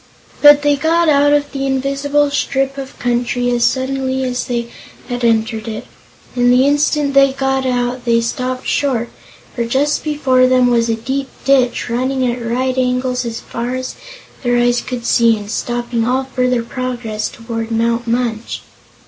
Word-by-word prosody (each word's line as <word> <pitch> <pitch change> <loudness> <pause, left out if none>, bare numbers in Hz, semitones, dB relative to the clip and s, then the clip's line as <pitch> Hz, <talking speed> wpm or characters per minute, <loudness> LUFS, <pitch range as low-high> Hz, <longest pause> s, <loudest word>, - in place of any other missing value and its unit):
But 290 0 +8
they 290 -1 +3
got 330 +3 +2
out 290 0 +4
of 290 0 +1
the 275 -1 -2
invisible 275 +2 0
strip 270 -1 -1
of 270 -1 -8
country 245 0 0
as 240 -1 +1
suddenly 265 0 0
as 250 -1 -2
they 235 -2 -3 0.4
had 245 0 -3
entered 225 -1 +1
it, 220 -1 -5 0.5
and 245 0 +3
the 250 +2 +4
instant 290 0 +1
they 275 -1 +5
got 270 -1 0
out 245 0 -1
they 235 -1 +3
stopped 255 +2 -3
short, 250 -5 0 0.5
for 235 - -1
just 270 +5 0
before 265 -4 +2
them 255 -1 +3
was 235 -1 +2
a 225 - +1
deep 265 +4 -3 0.2
ditch, 260 -2 +2
running 255 +2 -1
at 240 0 -2
right 255 +3 -1
angles 250 0 0
as 230 -1 -5
far 240 +2 -4
as 255 0 -4 0.5
their 245 -1 +1
eyes 240 0 +2
could 245 -2 -6
see 230 -2 +4
and 205 0 -8
stopping 240 0 -2
all 255 +3 +1
further 250 -2 0
progress 240 -3 -4
toward 230 -1 -5
Mount 230 +1 0
Munch. 230 -1 -2
250 Hz, 165 wpm, -17 LUFS, 235-270 Hz, 0.5 s, But